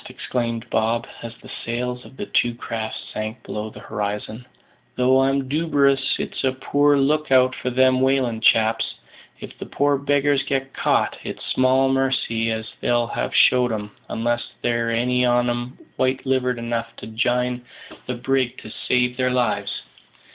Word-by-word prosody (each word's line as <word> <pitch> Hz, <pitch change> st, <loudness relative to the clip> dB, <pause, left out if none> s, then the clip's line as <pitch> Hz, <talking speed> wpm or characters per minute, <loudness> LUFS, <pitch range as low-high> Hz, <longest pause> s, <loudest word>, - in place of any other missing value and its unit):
exclaimed 115 Hz, -2 st, -3 dB
Bob, 115 Hz, +2 st, +1 dB, 0.2 s
as 115 Hz, -, -6 dB
the -, -, -12 dB
sails 125 Hz, +1 st, -3 dB
of 130 Hz, -, -15 dB
the -, -, -4 dB
two 120 Hz, -1 st, +1 dB
craft 110 Hz, -2 st, -4 dB, 0.2 s
sank 110 Hz, +2 st, -5 dB
below 105 Hz, +1 st, -5 dB
the -, -, -12 dB
horizon; 105 Hz, +3 st, -4 dB, 0.5 s
"though 130 Hz, +1 st, +4 dB
I'm 135 Hz, 0 st, +1 dB
duberous 140 Hz, -2 st, +2 dB
it's -, -, -4 dB
a 130 Hz, -1 st, +2 dB
poor 145 Hz, +2 st, +2 dB
look 150 Hz, +1 st, +1 dB
out 130 Hz, 0 st, +5 dB
for 125 Hz, -, -3 dB
them 130 Hz, +1 st, +3 dB
whalin' 130 Hz, -4 st, +1 dB
chaps. 110 Hz, 0 st, +3 dB, 0.4 s
If -, -, -9 dB
the -, -, -7 dB
poor 145 Hz, -1 st, +1 dB
beggars 145 Hz, 0 st, +2 dB
gets 135 Hz, -1 st, -2 dB
caught, -, -, +1 dB
it's -, -, -6 dB
small 130 Hz, +1 st, +3 dB
marcy 130 Hz, -4 st, +1 dB
as 110 Hz, 0 st, -3 dB
they'll 120 Hz, -1 st, +2 dB
have 115 Hz, -, -3 dB
showed 125 Hz, -1 st, +5 dB
'em, 105 Hz, -1 st, -4 dB, 0.2 s
unless 120 Hz, +1 st, -1 dB
there's 115 Hz, -1 st, +1 dB
any 125 Hz, +1 st, +2 dB
on 120 Hz, 0 st, +3 dB
'em 120 Hz, +1 st, -3 dB, 0.2 s
white 130 Hz, +1 st, 0 dB
livered 130 Hz, -2 st, +1 dB
enough 115 Hz, 0 st, -3 dB
to -, -, -9 dB
jine 125 Hz, +2 st, 0 dB, 0.5 s
the 125 Hz, -, -2 dB
brig 130 Hz, 0 st, 0 dB
to 110 Hz, -, -9 dB, 0.2 s
save 125 Hz, 0 st, +2 dB
their 130 Hz, -1 st, +2 dB
lives. 120 Hz, -5 st, -1 dB
125 Hz, 160 wpm, -22 LUFS, 115-135 Hz, 0.5 s, out